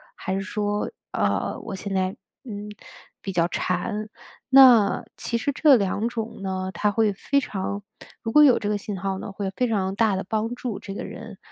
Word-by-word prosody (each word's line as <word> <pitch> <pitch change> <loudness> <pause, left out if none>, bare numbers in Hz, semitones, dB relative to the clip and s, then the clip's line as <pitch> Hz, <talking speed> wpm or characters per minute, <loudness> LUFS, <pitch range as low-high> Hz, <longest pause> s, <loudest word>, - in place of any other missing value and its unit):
还 190 - -3
是 195 - -1
说， 205 +1 -2 0.2
呃 - - 0
我 210 - -6
现 195 +1 -5
在， 190 +1 0 0.3
嗯， 210 -3 -6 0.5
比 195 - -5
较 170 -1 +3
馋。 210 +5 -2 0.4
那 255 -6 +7
其 235 - -2
实 280 +5 -1
这 290 0 +6
两 205 0 0
种 230 -3 -5
呢， 190 -1 -3
它 210 - +1
会 220 0 +2
非 280 +8 0
常 200 -3 -4 0.4
如 225 - -2
果 300 - +7
有 275 -5 +7
这 205 - -2
个 210 - +1
信 205 -1 -5
号 190 +1 -2
呢， 200 - -7
会 195 -1 -3
非 250 - +2
常 195 -4 0
大 220 -3 +3
地 190 - -2
帮 220 +3 -1
助 245 -5 -4
这 195 - -7
个 - - -5
人， 220 -3 -9
210 Hz, 210 characters per minute, -24 LUFS, 195-230 Hz, 0.5 s, 那